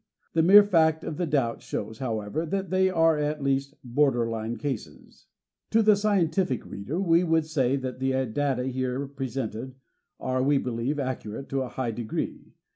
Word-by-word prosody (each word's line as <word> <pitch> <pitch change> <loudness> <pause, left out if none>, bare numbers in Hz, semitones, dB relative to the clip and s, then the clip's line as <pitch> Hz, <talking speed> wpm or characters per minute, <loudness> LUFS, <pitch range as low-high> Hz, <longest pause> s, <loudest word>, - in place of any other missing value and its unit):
The 165 - +3
mere 200 +5 +9
fact 160 -5 +3
of 150 - -5
the 175 - -1
doubt 135 -6 0
shows, 110 +2 -5
however, 110 +3 -2
that 190 +3 -3
they 190 0 +3
are 165 -3 +3
at 150 0 -2
least 140 +1 0
border 125 -2 +2
line 115 +1 -3
cases. 115 - -6 0.4
To 225 0 +3
the 215 -1 +6
scientific 190 - +1
reader 130 - -5
we 170 -2 +3
would 165 -2 +2
say 135 -4 +1
that 130 -2 -4
the 130 0 0
data 130 0 +1 0.3
x - - 0
PREFACE 125 +1 -3
here 130 +1 -2
presented 130 -2 -5 0.4
are, 130 0 -1
we 140 +2 +3
believe, 125 +3 -2
accurate 130 -2 -4
to 135 -1 -1
a 130 - -3
high 125 -2 -3
de 120 +2 -5
gree. 110 - -5
135 Hz, 185 wpm, -26 LUFS, 125-160 Hz, 0.4 s, mere